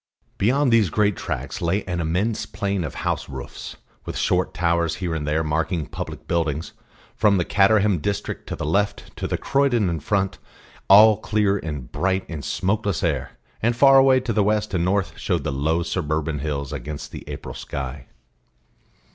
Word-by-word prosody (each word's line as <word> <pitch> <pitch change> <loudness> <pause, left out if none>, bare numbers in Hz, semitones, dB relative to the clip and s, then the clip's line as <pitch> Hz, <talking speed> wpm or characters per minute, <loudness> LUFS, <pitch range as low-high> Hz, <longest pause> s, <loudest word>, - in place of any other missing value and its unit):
Beyond 130 +5 +3
these 110 -5 +4
great 105 +3 +2
tracks - - -4
lay 90 +5 0
an 90 -2 -3
immense 90 +8 -1
plain 100 -3 -2
of 75 - -5
house - - -1
roofs, 65 -2 -8 0.3
with - - -5
short - - +1
towers 85 -1 +1
here 90 -3 -3
and 75 -2 -3
there 80 +2 +1
marking 80 +1 -1
public - - -7
buildings, 80 -2 -1 0.4
from 105 -1 +3
the 90 - 0
Caterham 100 -2 +3
district 100 +6 -4
on - - -3
the - - -3
left 100 +6 -1
to - - -2
Croydon 125 -9 +1
in 80 - -2
front, 95 +3 -1 0.5
all 105 +2 +8
clear 105 -2 +1
and 75 -8 -6
bright 95 0 0
in 80 -4 -6
smokeless 100 +2 -1
air; 75 -7 -1 0.2
and 120 +2 +2
far 135 +2 +7
away 135 -1 +5
to 125 -2 -2
the 105 -1 +3
west 105 +1 0
and 85 -2 +1
north 95 +1 0
showed - - -1
the - - -2
low 80 +5 0
suburban 80 -3 -2
hills 70 -2 -3
against 75 -1 -6
the - - -8
April - - -6
sky. 65 -1 -6
90 Hz, 170 wpm, -23 LUFS, 80-105 Hz, 0.5 s, all